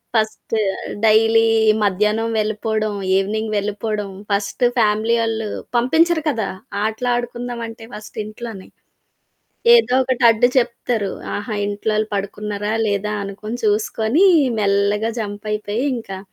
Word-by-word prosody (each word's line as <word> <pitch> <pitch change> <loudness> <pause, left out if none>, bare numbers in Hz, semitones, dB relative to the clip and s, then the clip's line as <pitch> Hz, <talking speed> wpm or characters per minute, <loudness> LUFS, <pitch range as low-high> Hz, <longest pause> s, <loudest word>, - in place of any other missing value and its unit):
First 220 0 -1 0.5
daily 225 +1 +5 0.4
మధ్యాహ్నం 210 +3 +1
వెళ్ళిపోవడం, 215 0 -1 0.2
evening 215 +3 -1
వెళ్ళిపోవడం, 210 0 -2 0.2
ఫస్ట్ 200 +4 0
ఫ్యామిలీ 220 +1 +2
ఒళ్ళు 225 -1 -2 0.3
పంపించరు 320 +7 +3
కదా! 225 -7 -1 0.4
ఆటలడుకుందాం 240 +1 -2
అంటే 225 0 -10
ఫస్ట్ 215 0 -10
ఇంట్లోని. 215 -2 -8 1.1
ఏదో 460 - +4
ఒకటి 255 -1 -2
అడ్డు 225 +1 +5
చెప్తరు 235 -4 0 0.2
ఆహా! 205 +1 -4
ఇంట్లో‌ళ్ళు 215 +1 -1
పడుకున్నారా? 205 +1 -3
లేదా? 205 +1 -1
అనుకుని 205 +3 -6
చూసుకొని, 220 - +2 0.3
మెల్లగా 205 +2 +1
జంప్ 205 -1 -6
అయిపోయి, 210 +2 -2
ఇంకా 195 -5 -7
215 Hz, 105 wpm, -20 LUFS, 205-230 Hz, 1.1 s, daily